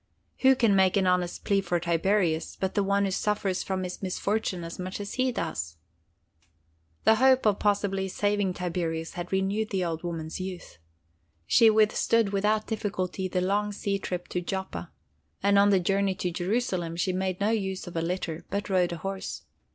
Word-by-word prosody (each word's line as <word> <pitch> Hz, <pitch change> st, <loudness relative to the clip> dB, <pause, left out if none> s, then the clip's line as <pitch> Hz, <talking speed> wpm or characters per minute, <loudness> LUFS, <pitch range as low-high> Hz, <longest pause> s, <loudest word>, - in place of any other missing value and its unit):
Who 265 Hz, 0 st, +6 dB
can 230 Hz, -5 st, +3 dB
make 190 Hz, 0 st, +4 dB
an 195 Hz, -, +2 dB
honest 180 Hz, -1 st, 0 dB
plea 200 Hz, -1 st, +2 dB
for 175 Hz, -2 st, 0 dB
Tiberius, 170 Hz, 0 st, +1 dB
but 190 Hz, -1 st, -1 dB
the 205 Hz, -, +2 dB
one 200 Hz, 0 st, +2 dB
who 195 Hz, -, -1 dB
suffers 195 Hz, -1 st, 0 dB
from 190 Hz, -1 st, -2 dB
his 180 Hz, 0 st, -6 dB
misfortune 195 Hz, -1 st, -1 dB
as 165 Hz, +2 st, -7 dB
much 185 Hz, +2 st, -4 dB
as 200 Hz, 0 st, -5 dB
he 255 Hz, 0 st, +1 dB
does?" 85 Hz, -, -4 dB, 1.3 s
The 220 Hz, -, +6 dB
hope 260 Hz, 0 st, +4 dB
of 205 Hz, -2 st, +3 dB
possibly 200 Hz, -2 st, +1 dB
saving 205 Hz, -1 st, 0 dB
Tiberius 165 Hz, -2 st, -3 dB
had 175 Hz, 0 st, -6 dB
renewed 195 Hz, +3 st, 0 dB
the 190 Hz, -3 st, 0 dB
old 165 Hz, -1 st, -3 dB
woman's 165 Hz, -2 st, -5 dB
youth. 185 Hz, -, -7 dB, 0.7 s
She 225 Hz, -, +6 dB
withstood 220 Hz, 0 st, +3 dB
without 210 Hz, +2 st, +1 dB
difficulty 190 Hz, -3 st, -2 dB
the 180 Hz, 0 st, -1 dB
long 205 Hz, +3 st, 0 dB
sea 200 Hz, -1 st, -2 dB
trip 180 Hz, -2 st, -4 dB
to 180 Hz, -, -2 dB
Joppa, 190 Hz, -1 st, -5 dB, 0.5 s
and 200 Hz, 0 st, +5 dB
on 200 Hz, 0 st, +5 dB
the 195 Hz, -2 st, +4 dB
journey 195 Hz, +1 st, +1 dB
to 180 Hz, -1 st, -2 dB
Jerusalem 180 Hz, -2 st, -1 dB
she 180 Hz, +2 st, 0 dB
made 185 Hz, 0 st, -2 dB
no 205 Hz, +2 st, +2 dB
use 190 Hz, -4 st, -2 dB
of 175 Hz, -, -9 dB
a 165 Hz, -, 0 dB
litter, 170 Hz, -1 st, -3 dB
but 200 Hz, 0 st, -3 dB
rode 180 Hz, -2 st, +2 dB
a -, -, -5 dB
horse. 195 Hz, +3 st, -5 dB
190 Hz, 180 wpm, -27 LUFS, 180-205 Hz, 1.3 s, Who